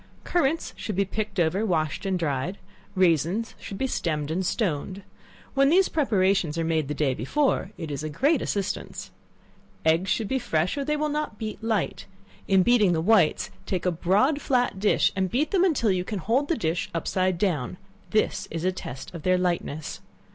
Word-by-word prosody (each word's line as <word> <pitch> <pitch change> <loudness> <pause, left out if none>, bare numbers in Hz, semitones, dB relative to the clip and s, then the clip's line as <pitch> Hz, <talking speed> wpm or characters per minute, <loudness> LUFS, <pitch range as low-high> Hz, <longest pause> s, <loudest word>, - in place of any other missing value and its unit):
Currants 325 -1 0
should 210 - -4
be 200 +1 +2
picked 210 0 -3
over, 175 +5 +2
washed 165 -2 -1
and 190 -1 +1
dried; 160 +3 -2 0.4
raisins 185 +4 +2
should 195 - -7
be 265 - 0
stemmed 155 - -2
and 180 +4 0
stoned. 185 -1 -2 0.5
When 275 0 +4
these 370 +4 +4
preparations 190 - +1
are 165 - 0
made 160 -3 0
the 150 - -3
day 140 -4 +1
before, 190 - 0
it 165 -4 -5
is 140 +1 -4
a 155 - -3
great 270 - +2
assistance. 200 -1 -3 0.7
Eggs 165 +4 +3
should 220 - 0
be 265 +3 0
fresh, 170 -6 0
or 285 - -2
they 300 +2 0
will 305 +1 0
not 300 -7 -3
beat 215 +1 -6
light: 225 -3 -1 0.4
in 190 -1 +4
beating 215 -5 +4
the 160 - +1
whites, 180 -2 +3 0.2
take 185 -2 -2
a 180 - +3
broad 205 - +2
flat 245 -6 +1
dish, 205 +1 +3
and 190 -1 0
beat 280 - 0
them 375 -2 +3
until 275 - +2
you 180 -1 0
can 205 +3 -4
hold 235 - +1
the 335 - 0
dish 165 -3 -1
upside 185 +2 0
down, 170 - -1 0.3
this 215 - 0
is 165 +1 -4
a 185 - +3
test 135 -7 -8
of 170 - -7
their 185 +3 +3
lightness. 170 -4 -2
190 Hz, 190 wpm, -26 LUFS, 165-230 Hz, 0.7 s, When